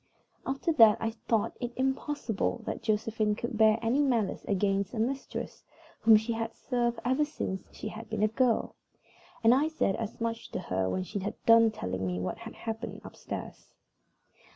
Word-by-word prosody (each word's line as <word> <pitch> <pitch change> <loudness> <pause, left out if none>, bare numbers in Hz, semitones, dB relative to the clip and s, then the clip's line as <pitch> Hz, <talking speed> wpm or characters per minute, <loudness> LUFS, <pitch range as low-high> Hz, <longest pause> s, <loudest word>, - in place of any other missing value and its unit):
After 275 +5 0
that 225 -7 +7
I 225 - -1 0.2
thought 225 -3 +1
it 245 -1 -4
impossible 260 - -1
that - - -4
Josephine 215 -1 0
could 235 +1 -4
bear 220 0 +5
any 245 +6 +2
malice 240 -8 +1
against 195 0 0
a - - -3
mistress 265 +4 -3 0.4
whom 220 -1 +7
she 220 +2 -2
had 225 0 -3
served 240 -2 -1
ever 260 +4 +3
since 240 -10 -4
she 220 - -6
had 220 +1 -9
been 220 -1 -1
a - - +5
girl, 235 +1 +1 0.7
and 225 +1 +7
I 280 +4 +3
said 315 -11 0
as 225 -1 -5
much 230 0 -3
to - - -1
her 95 - -1
when 185 - -1
she 200 +2 -4
had 200 +2 -4
done 230 0 +7
telling 95 - -3
me 90 0 -2
what 90 +1 -3
had 230 0 -9
happened 225 0 -5
upstairs. - - -8
225 Hz, 175 wpm, -29 LUFS, 210-240 Hz, 0.7 s, that